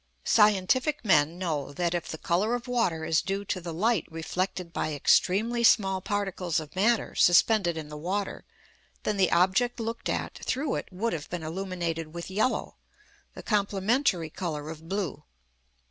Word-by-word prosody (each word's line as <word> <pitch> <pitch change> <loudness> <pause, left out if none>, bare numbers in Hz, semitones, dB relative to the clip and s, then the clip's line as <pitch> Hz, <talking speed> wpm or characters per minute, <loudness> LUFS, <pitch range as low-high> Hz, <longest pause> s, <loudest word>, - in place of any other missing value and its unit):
Scientific 225 +7 +3
men 160 -3 +3
know 155 -6 -2
that, 170 +3 -1
if 175 -2 -2
the 160 - -5
colour 195 +9 +1
of 245 +1 -6
water 185 -10 0
is 160 -1 +2
due 195 +1 -3
to 185 -2 -2
the 170 0 -5
light 200 +2 +1
reflected 180 +2 -3
by 155 -1 -2
extremely 220 - +2
small 195 -4 +4
particles 195 -4 -1
of 155 +1 -10
matter 220 +4 +2
suspended 175 -1 +4
in 155 -2 -6
the 150 - -7
water, 190 +6 -3 0.6
then 210 - -1
the 190 -2 +3
object 195 +8 +2
looked 230 0 -4
at - - -3
through 270 +2 -1
it - - -3
would 220 +6 -2
have 155 -3 -5
been 175 -2 -4
illuminated 165 -2 -4
with 170 +2 -6
yellow 215 +6 -1 0.6
(the - - -9
complementary 200 - +1
colour 155 -4 -4
of 160 +1 -11
blue). 195 -5 -3
185 Hz, 160 wpm, -28 LUFS, 165-215 Hz, 0.6 s, small